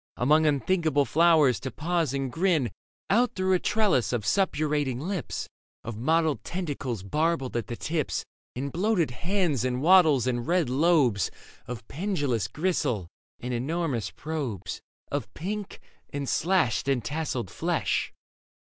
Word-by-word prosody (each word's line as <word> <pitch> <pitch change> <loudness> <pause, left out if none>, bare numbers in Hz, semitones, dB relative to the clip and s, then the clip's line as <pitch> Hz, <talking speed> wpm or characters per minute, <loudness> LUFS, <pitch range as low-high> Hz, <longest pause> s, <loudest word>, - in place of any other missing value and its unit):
Among 155 +5 +4
unthinkable 150 0 +2
flowers, 155 - +4
to 130 - -4
pause 165 0 -1
and 135 -2 -2
grin 160 - +1 0.4
Out 240 +4 +3
through 185 0 +1
a 185 - +3
trellis 210 - +2
of 120 -4 -2
suppurating 150 - +1
lips. 175 +1 -3 0.4
Of 120 - -5
mottled 160 +6 +1
tentacles 140 - -4
barbed 150 - 0
at 120 - -1
the 120 - -4
tips 155 +4 -2 0.3
And 135 +3 -3
bloated 180 - +1
hands 165 - 0
and 125 -1 0
wattles 155 -5 +5
and 120 -1 -1
red 170 -7 +2
lobes 140 - +3 0.4
Of 120 -4 -7
pendulous 145 - -1
gristle 135 - -1 0.3
and 125 +1 -3
enormous 135 -1 -1
probes 130 - -5 0.3
Of 135 -7 -3
pink 205 +4 -5 0.3
and 140 -1 -4
slashed 160 - +1
and 130 -5 +1
tasselled 140 - -3
flesh - - -1
145 Hz, 135 wpm, -27 LUFS, 125-170 Hz, 0.4 s, wattles